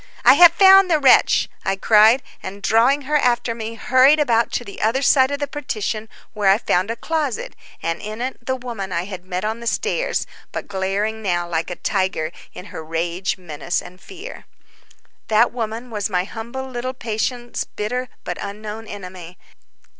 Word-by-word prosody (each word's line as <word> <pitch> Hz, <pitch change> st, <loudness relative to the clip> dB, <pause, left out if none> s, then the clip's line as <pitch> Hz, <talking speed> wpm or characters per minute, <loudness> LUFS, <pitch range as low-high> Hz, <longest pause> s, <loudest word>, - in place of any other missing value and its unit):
"I -, -, +9 dB
have 345 Hz, -1 st, +8 dB
found 385 Hz, +1 st, +7 dB
the 325 Hz, -, +4 dB
wretch," 275 Hz, -3 st, +4 dB, 0.2 s
I 195 Hz, -, 0 dB
cried, 220 Hz, +5 st, +5 dB, 0.2 s
and 200 Hz, +1 st, -8 dB
drawing 255 Hz, +8 st, +3 dB
her 300 Hz, +3 st, +1 dB
after 240 Hz, -3 st, +1 dB
me, 225 Hz, 0 st, -6 dB
hurried 260 Hz, +6 st, +4 dB
about 235 Hz, -5 st, +2 dB
to -, -, -1 dB
the 200 Hz, -, -9 dB
other 245 Hz, +6 st, +1 dB
side 265 Hz, -1 st, +5 dB
of 285 Hz, -, -2 dB
the 285 Hz, -, -2 dB
partition, 220 Hz, -6 st, -4 dB, 0.2 s
where 205 Hz, -3 st, +2 dB
I 195 Hz, -, +6 dB
found 185 Hz, -3 st, 0 dB
a 230 Hz, -, -2 dB
closet, 295 Hz, -1 st, -3 dB, 0.3 s
and 165 Hz, 0 st, -2 dB
in 215 Hz, +1 st, -6 dB
it 255 Hz, 0 st, -5 dB
the 260 Hz, +2 st, -1 dB
woman 235 Hz, -7 st, -6 dB
I 170 Hz, -1 st, -1 dB
had 185 Hz, -2 st, -8 dB
met 185 Hz, +1 st, -4 dB
on 220 Hz, +2 st, -2 dB
the 235 Hz, -, -7 dB
stairs, -, -, -1 dB, 0.3 s
but -, -, -5 dB
glaring 205 Hz, +3 st, -2 dB
now 175 Hz, -4 st, -1 dB
like 165 Hz, -1 st, -2 dB
a 175 Hz, -, -4 dB
tiger 185 Hz, -5 st, -1 dB, 0.2 s
in 180 Hz, -, -10 dB
her 160 Hz, -, -6 dB
rage, 170 Hz, +4 st, -2 dB
menace, 170 Hz, -2 st, -3 dB
and 180 Hz, +1 st, -12 dB
fear. 390 Hz, +5 st, -10 dB, 0.8 s
That 220 Hz, +2 st, +3 dB
woman 235 Hz, +1 st, -5 dB
was 210 Hz, -1 st, -2 dB
my 180 Hz, -2 st, 0 dB
humble 235 Hz, +6 st, -7 dB
little 255 Hz, 0 st, -5 dB
patient's 240 Hz, +1 st, -3 dB
bitter 250 Hz, +4 st, -4 dB
but -, -, -5 dB
unknown 210 Hz, +2 st, -7 dB
enemy. 185 Hz, -3 st, -9 dB
220 Hz, 180 wpm, -21 LUFS, 195-255 Hz, 0.8 s, I